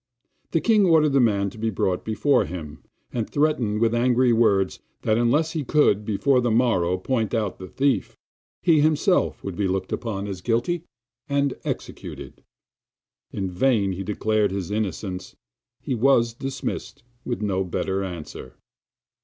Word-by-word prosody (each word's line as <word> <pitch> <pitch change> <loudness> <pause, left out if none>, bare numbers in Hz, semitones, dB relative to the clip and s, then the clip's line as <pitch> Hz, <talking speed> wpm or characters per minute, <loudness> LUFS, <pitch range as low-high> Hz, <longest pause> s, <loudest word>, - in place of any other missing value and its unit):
The 165 - +1
king 215 -4 +4
ordered 155 -4 +4
the 135 - +4
man 100 -5 +2
to 110 - -13
be 115 +1 0
brought 95 -3 -1
before 110 +6 +2
him, 75 -3 -8 0.3
and 115 -3 -2
threatened 130 -8 +1
with 115 0 +3
angry 125 +1 +3
words 100 -5 +2 0.2
that 110 - +2
unless 135 +8 +2
he 160 -3 -2
could 120 -8 +2
before 125 +5 +2
the 120 - +1
morrow 110 -7 +2
point 115 +3 -1
out 105 -4 -2
the 95 - -8
thief, 135 -5 0 0.5
he 165 -3 +5
himself 155 +5 +2
should 95 -3 -5
be 100 0 0
looked 95 0 -2
upon 100 -4 -3
as 95 -3 -6
guilty 125 - -1 0.4
and 140 -1 +1
executed. - - -6 0.9
In 95 -2 -3
vain 105 -1 +2
he 95 +1 -4
declared 105 +1 +1
his 95 -1 -4
innocence; 95 -3 -3 0.5
he - - -2
was 120 -1 +3
dismissed 135 -1 -5 0.2
with 120 -3 -3
no 95 -2 0
better 95 +1 -2
answer. 85 -8 -8
110 Hz, 155 wpm, -24 LUFS, 95-135 Hz, 0.9 s, he